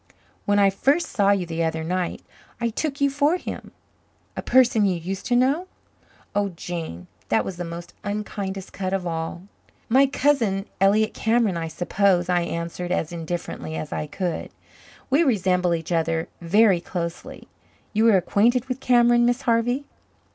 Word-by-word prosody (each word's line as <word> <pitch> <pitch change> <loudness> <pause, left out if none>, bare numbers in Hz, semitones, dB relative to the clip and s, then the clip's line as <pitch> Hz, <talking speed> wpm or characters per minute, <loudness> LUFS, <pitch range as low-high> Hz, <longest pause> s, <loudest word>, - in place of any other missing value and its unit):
When 205 0 +2
I 200 -1 +5
first 280 - +1
saw 200 -2 +2
you 200 -3 +2
the 165 0 -2
other 160 0 -1
night 180 +1 -2 0.4
I 235 0 0
took 280 +5 -3
you 280 0 +3
for 290 +5 +2
him." - - -7 0.6
A - - -3
person 240 -5 +4
you 185 - +1
used 185 +3 -5
to 245 - +2
know! 275 +9 +2 0.7
Oh, 205 -1 +1
Jane, 160 - -6 0.2
that 110 - +2
was 185 - -5
the 175 - -3
most 170 0 -8
unkindest 200 -2 -4
cut 190 -1 -3
of 190 -2 -1
all. 165 +1 -4 0.5
"My 265 +4 +5
cousin, 245 -9 +1
Elliott 210 +3 +3
Cameron, 225 -4 +1
I 165 -1 -3
suppose?" 180 +2 +1
I 175 -1 +3
answered 170 +1 -4
as 165 -3 -1
indifferently 165 -1 -5
as 155 - -5
I 150 - -3
could. 175 +2 -3 0.6
"We 280 +5 +4
resemble 180 - +2
each 165 +1 -6
other 165 0 0
very 190 +1 +4
closely. 170 -1 -6 0.5
You 220 +1 +3
were 220 -4 +6
acquainted 230 +7 +2
with 255 0 -4
Cameron, 240 -2 +4
Miss 245 +1 +1
Harvey?" 245 +4 +1
195 Hz, 160 wpm, -24 LUFS, 170-240 Hz, 0.7 s, were